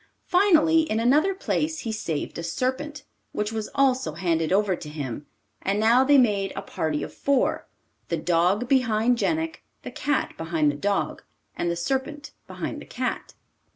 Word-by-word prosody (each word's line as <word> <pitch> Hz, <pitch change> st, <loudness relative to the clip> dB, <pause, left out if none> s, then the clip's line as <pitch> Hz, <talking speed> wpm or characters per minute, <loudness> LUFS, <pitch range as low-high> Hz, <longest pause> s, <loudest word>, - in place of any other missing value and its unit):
Finally, 330 Hz, -4 st, +4 dB
in 220 Hz, -, +1 dB
another 300 Hz, +11 st, +3 dB
place, 315 Hz, -4 st, -1 dB
he 225 Hz, -, -3 dB
saved 170 Hz, -8 st, -3 dB
a -, -, -4 dB
serpent, 265 Hz, -, -3 dB, 0.3 s
which 210 Hz, +1 st, -2 dB
was 220 Hz, -1 st, -4 dB
also 260 Hz, -, +2 dB
handed 165 Hz, -1 st, 0 dB
over 195 Hz, -1 st, +2 dB
to 150 Hz, -, -9 dB
him 145 Hz, -2 st, -6 dB, 0.3 s
and 200 Hz, +2 st, 0 dB
now 230 Hz, +4 st, +5 dB
they 285 Hz, +1 st, +5 dB
made 205 Hz, -6 st, +2 dB
a -, -, -3 dB
party 155 Hz, -2 st, -2 dB
of -, -, -7 dB
four 280 Hz, -2 st, 0 dB, 0.4 s
the 170 Hz, -, -1 dB
dog 180 Hz, +8 st, +1 dB
behind 245 Hz, -2 st, +2 dB
Jenik, 320 Hz, +1 st, -1 dB, 0.2 s
the -, -, -6 dB
cat 290 Hz, -2 st, -1 dB
behind 160 Hz, -2 st, +1 dB
the -, -, -7 dB
dog, 200 Hz, +6 st, -1 dB, 0.3 s
and 175 Hz, -, -1 dB
the 170 Hz, -, -1 dB
serpent 270 Hz, -, -3 dB, 0.2 s
behind -, -, -5 dB
the -, -, -10 dB
cat. -, -, -4 dB
220 Hz, 165 wpm, -25 LUFS, 170-280 Hz, 0.4 s, now